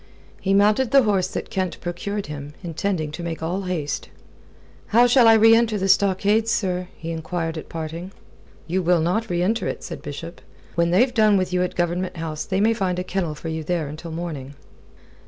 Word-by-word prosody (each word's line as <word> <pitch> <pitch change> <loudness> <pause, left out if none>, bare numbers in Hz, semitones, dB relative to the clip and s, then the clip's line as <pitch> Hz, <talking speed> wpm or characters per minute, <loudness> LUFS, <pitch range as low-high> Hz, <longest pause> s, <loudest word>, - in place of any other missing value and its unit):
He 195 0 +2
mounted 210 +5 +4
the 275 +1 +6
horse 195 -4 +2
that - - -6
Kent 185 -2 -2
procured 195 +4 -4
him, 145 0 -8
intending 165 -2 -2
to 160 - -7
make 165 -1 -4
all 180 +4 -1
haste. 155 -6 -3 0.8
"How 235 +3 +5
shall 245 -1 +5
I 225 - +8
reenter 225 0 +5
the 195 -1 -1
stockade, 200 +3 +3
sir?" 185 -6 0
he 165 +1 -6
enquired 165 0 -3
at 160 - -7
parting. 165 +3 -6 0.5
"You'll 175 0 +2
not 180 +8 0
reenter 180 +6 0
it," - - -4
said - - -7
Bishop. 165 +4 -8 0.3
"When 170 0 +2
they've 245 +9 +3
done 215 -3 +4
with 185 -1 -1
you 180 - +2
at 180 - -2
Government 175 +1 -1
House, 160 -2 -4
they 190 -1 -1
may 220 +3 +4
find 190 -5 -1
a 180 - -1
kennel 180 -4 -2
for 160 +2 -6
you 160 0 -3
there 165 -1 -1
until 155 +3 -8
morning." 160 -5 -6
180 Hz, 190 wpm, -23 LUFS, 165-205 Hz, 0.8 s, I